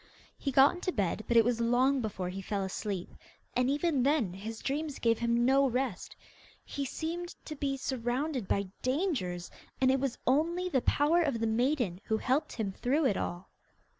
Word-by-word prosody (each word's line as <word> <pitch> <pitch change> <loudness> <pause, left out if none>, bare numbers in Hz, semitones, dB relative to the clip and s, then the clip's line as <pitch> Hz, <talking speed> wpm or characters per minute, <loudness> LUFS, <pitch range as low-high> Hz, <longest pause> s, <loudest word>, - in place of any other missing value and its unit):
He 275 - -3
got 270 +2 +6
into 355 +1 -3
bed, 205 - -1
but 235 - +3
it 225 - +7
was 235 -1 +1
long 255 +3 +3
before 195 -5 -3
he 190 +2 -5
fell 195 +1 -2
asleep, 190 -1 -4 0.4
and 250 +1 +2
even 290 -1 +1
then 260 - +2
his 215 +4 -6
dreams 290 +1 -2
gave 230 -1 +2
him 235 0 +2
no 270 +1 +4
rest. 250 -6 -2 0.5
He 280 - -4
seemed 340 +5 -4
to 305 - -6
be 275 -1 -1
surrounded 255 -1 -2
by 200 -1 0
dangers, 255 - -1 0.3
and 260 0 +4
it 265 - +2
was 270 -2 -2
only 335 +7 +1
the 265 -7 +2
power 305 +7 +3
of 280 -8 0
the 225 - 0
maiden 230 - 0
who 220 - +1
helped 275 +6 0
him 215 -4 -2
through 275 +9 0
it 220 -7 +3
all. 175 +1 -4
255 Hz, 185 wpm, -31 LUFS, 220-285 Hz, 0.5 s, it